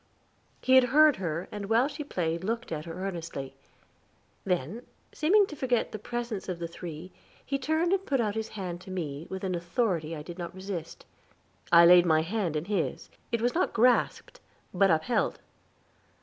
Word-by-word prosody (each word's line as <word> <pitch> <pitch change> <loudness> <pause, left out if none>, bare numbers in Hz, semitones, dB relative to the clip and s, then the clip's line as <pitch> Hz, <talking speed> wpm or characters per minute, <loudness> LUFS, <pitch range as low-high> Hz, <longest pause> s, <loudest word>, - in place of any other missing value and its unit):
He 260 - +3
had 260 -1 +8
heard 300 +3 +5
her, 170 -2 -3
and 205 -1 -6
while 230 +4 +4
she 295 +1 -6
played 170 - -2
looked 230 +2 -3
at 155 -1 -4
her 175 +3 -5
earnestly. 165 -7 -5 0.9
Then, 180 - -2 0.3
seeming 400 +7 +4
to 315 - -9
forget 250 -4 0
the 215 - -6
presence 235 -3 -4
of 180 - -3
the 170 0 -4
three, 170 +1 -8 0.3
he 275 0 -1
turned 315 +6 +1
and 390 -1 +1
put 275 -7 0
out 215 -3 0
his 220 0 -3
hand 180 -3 -5
to 190 - -12
me, 160 -4 -5
with 190 0 -6
an 185 -1 -1
authority 170 -2 -1
I 150 - -7
did 175 +2 -9
not 175 +1 -6
resist. 185 -4 -6 0.7
I 170 0 +8
laid 175 0 +7
my 160 -1 +4
hand 180 -2 -2
in 150 +2 -2
his; 195 -4 -2 0.2
it 235 -1 0
was 245 - +2
not 355 - 0
grasped, 245 +2 +2 0.3
but 195 +1 +4
upheld. 165 +9 +1
190 Hz, 180 wpm, -28 LUFS, 170-240 Hz, 0.9 s, had